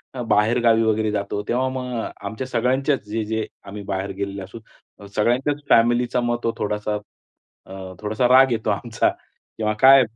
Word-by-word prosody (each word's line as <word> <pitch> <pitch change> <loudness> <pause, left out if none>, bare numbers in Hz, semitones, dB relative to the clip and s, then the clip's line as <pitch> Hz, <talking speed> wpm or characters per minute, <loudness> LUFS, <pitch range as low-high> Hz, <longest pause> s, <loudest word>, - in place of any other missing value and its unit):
अ, 125 - -4
बाहेरगावी 115 +1 +3
वगैरे 110 -1 +1
जातो 100 0 -2
तेव्हा 130 +2 +1
मग 130 -1 -5 0.3
आमच्या 120 +4 -5
सगळ्यांच्याच 130 +3 0
जे-जे 110 0 -2 0.2
आम्ही 100 +1 -7
बाहेर 100 0 -3
गेलेले 100 0 -4
असू 95 +5 -10 0.6
सगळ्यांच्याच 130 +7 +1
फॅमिलीचा 120 +1 +3
मग 120 0 0
तो 115 - 0
थोडासा 105 0 -2 0.7
अ, 95 -1 -9
थोडासा 110 +4 0
राग 130 +1 +6
येतो 110 -1 -1
आमचा 110 +3 0 0.5
किंवा 110 -1 0
काय 135 +2 +8
115 Hz, 150 wpm, -22 LUFS, 105-125 Hz, 0.7 s, काय